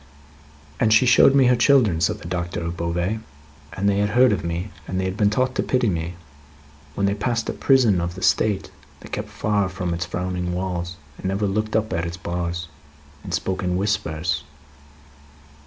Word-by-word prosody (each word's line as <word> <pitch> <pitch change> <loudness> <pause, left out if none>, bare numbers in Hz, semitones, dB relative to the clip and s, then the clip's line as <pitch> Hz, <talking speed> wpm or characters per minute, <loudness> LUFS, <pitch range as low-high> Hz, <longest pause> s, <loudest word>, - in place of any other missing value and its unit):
"And 110 - +3
she 110 +4 +6
showed 125 +2 +6
me 135 -2 +6
her 125 0 +5
children," 120 - +4
said - - +1
the 80 - -8
Doctor 85 -1 -3
of 85 +1 -3
Beauvais, 85 +5 -1 0.5
"and 100 +1 -1
they 100 0 +2
had 105 0 +1
heard 125 +3 +5
of 100 -6 -1
me, 85 +4 -3 0.2
and 95 - -2
had 95 0 -2
been 105 -1 +3
taught 130 +4 0
to - - 0
pity 125 -3 +1
me. 85 -1 -3 0.8
When 100 - 0
they 100 - +2
passed 115 +2 -1
a - - -1
prison 120 -10 +3
of 85 +1 -3
the 95 - -7
State, 100 -2 +1 0.3
they - - -11
kept - - -4
far 105 -3 0
from 90 -2 -3
its 85 +1 -3
frowning 90 0 -3
walls, 90 -2 -3 0.3
and 95 +1 -1
looked 105 +1 -1
up 110 0 0
at 85 0 -1
its 85 +1 -6
bars, 85 0 -3 0.6
and - - -7
spoke 95 -1 -1
in 90 0 0
whispers. 90 -5 -1
95 Hz, 190 wpm, -23 LUFS, 85-110 Hz, 0.8 s, she